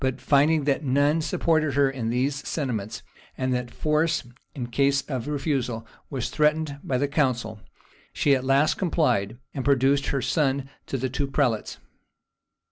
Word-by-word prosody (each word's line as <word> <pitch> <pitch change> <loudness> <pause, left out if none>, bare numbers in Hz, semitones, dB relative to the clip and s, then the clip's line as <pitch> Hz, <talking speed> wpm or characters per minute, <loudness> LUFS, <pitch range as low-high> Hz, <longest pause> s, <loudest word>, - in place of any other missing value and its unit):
But 130 -1 0
finding 150 +2 +3
that 140 +1 0
none 145 +4 +2
supported 155 -2 +1
her 140 -1 +4
in 130 -4 -3
these 130 +4 +1
sentiments, 115 -9 -3 0.3
and 130 0 0
that 125 -1 -2
force, 155 +4 0 0.3
in 125 -4 -3
case 140 +2 +2
of 130 -4 -4
refusal, 135 -6 -2 0.2
was 130 -4 -3
threatened 150 -1 +1
by 130 - 0
the 145 +3 +1
council, 125 -7 0 0.5
she 145 - +2
at 130 - -2
last 140 +4 +2
complied, 120 - +1 0.2
and 135 - -3
produced 140 0 +3
her 135 -3 -1
son 140 -3 +1 0.2
to 135 - -2
the 130 +1 -1
two 135 +3 -2
prelates. 135 -5 0
140 Hz, 155 wpm, -25 LUFS, 125-150 Hz, 0.5 s, her